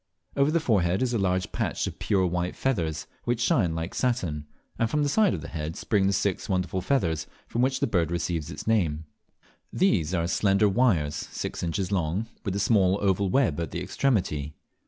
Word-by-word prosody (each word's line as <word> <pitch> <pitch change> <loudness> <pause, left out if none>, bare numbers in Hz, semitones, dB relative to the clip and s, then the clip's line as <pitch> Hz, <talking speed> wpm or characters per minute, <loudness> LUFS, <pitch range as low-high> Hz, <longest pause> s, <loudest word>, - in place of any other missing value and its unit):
Over 140 +1 +3
the 170 +2 +2
forehead 100 - +2
is 125 -1 0
a 115 - +1
large 95 -1 0
patch - - -1
of - - -6
pure 95 -2 +2
white 90 0 -1
feathers, 80 - -1 0.2
which 120 -1 0
shine 120 - +2
like 80 +2 -4
satin; 90 - -1 0.3
and 115 - +2
from 150 +4 +1
the 145 - +1
sides 205 +5 +3
of - - -6
the - - -7
head 80 0 -4
spring 100 -3 +1
the - - +3
six 100 -1 -1
wonderful 95 -1 0
feathers 85 - 0 0.2
from 120 - -1
which 130 +1 +1
the - - +4
bird 90 -7 +1
receives 85 -2 -2
its - - -7
name. 80 -9 +1 0.7
These 95 - +2
are 85 -1 0
slender 100 +4 +3
wires, 95 - +2
six - - -5
inches 90 +2 -2
long, 90 +2 0 0.2
with 100 -3 -2
a - - 0
small 100 -3 +3
oval 100 -1 +1
web 120 - +2
at 85 -3 -2
the - - -4
extremity. 75 - 0
95 Hz, 200 wpm, -26 LUFS, 85-115 Hz, 0.7 s, the